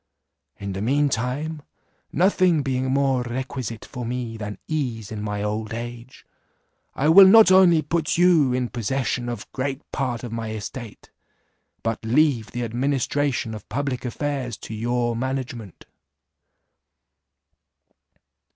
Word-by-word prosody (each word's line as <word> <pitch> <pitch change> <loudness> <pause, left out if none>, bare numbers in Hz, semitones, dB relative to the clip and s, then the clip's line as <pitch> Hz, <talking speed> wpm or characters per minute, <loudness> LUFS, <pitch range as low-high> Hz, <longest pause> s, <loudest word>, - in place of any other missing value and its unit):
In 100 -1 -5
the 95 - -4
mean 140 +6 +2
time, 140 +6 -2 0.5
nothing 180 -3 +3
being 130 -1 -1
more 135 -2 +2
requisite 125 -2 -5
for 125 - -7
me 120 -1 -4
than 105 -2 -6
ease 120 -9 -3
in 105 -1 -5
my 105 -1 -3
old 110 +1 -3
age, 120 +1 -8 0.7
I 140 - +1
will 190 +4 +9
not 215 0 +8
only 180 -4 +6
put 160 +1 -1
you 170 -7 +5
in 125 -1 -1
possession 125 +1 -2
of 120 -3 -6
great 135 +2 -3
part 125 -4 -2
of 120 - -6
my 115 -1 -4
estate, 110 +1 -8 0.7
but 115 0 -2
leave 125 -1 +2
the 120 0 -4
administration 130 0 -1
of 105 -2 -10
public 140 -2 -2
affairs 130 -3 -3
to - - -7
your 120 +1 -1
management." 125 -5 -5
125 Hz, 130 wpm, -23 LUFS, 115-145 Hz, 0.7 s, will